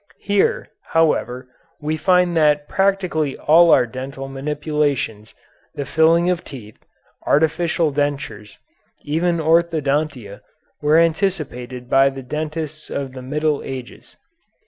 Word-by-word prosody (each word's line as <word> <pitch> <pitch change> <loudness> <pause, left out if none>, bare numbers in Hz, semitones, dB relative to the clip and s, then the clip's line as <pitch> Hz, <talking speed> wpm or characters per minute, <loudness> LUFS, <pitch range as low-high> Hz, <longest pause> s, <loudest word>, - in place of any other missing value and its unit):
Here, 200 -1 +1
however, 130 -6 0 0.3
we 155 +1 -2
find 180 +1 +2
that 150 -2 +3
practically 185 -7 0
all 170 +3 +5
our 125 - +5
dental 135 +3 -7
manipulations, 140 -5 -2 0.4
the 140 - -4
filling 165 +4 +3
of 180 -1 0
teeth, 110 -6 -11 0.4
artificial 160 +1 +2
dentures, 140 -7 -3 0.5
even 170 +3 0
orthodontia, 155 -8 0 0.4
were 150 +2 +4
anticipated 155 -8 -1
by 135 +2 +4
the 135 -1 -8
dentists 155 +2 -5
of 135 -2 -4
the 130 - -8
Middle 150 +3 -1
Ages. 130 -2 -9
150 Hz, 110 wpm, -20 LUFS, 135-165 Hz, 0.5 s, all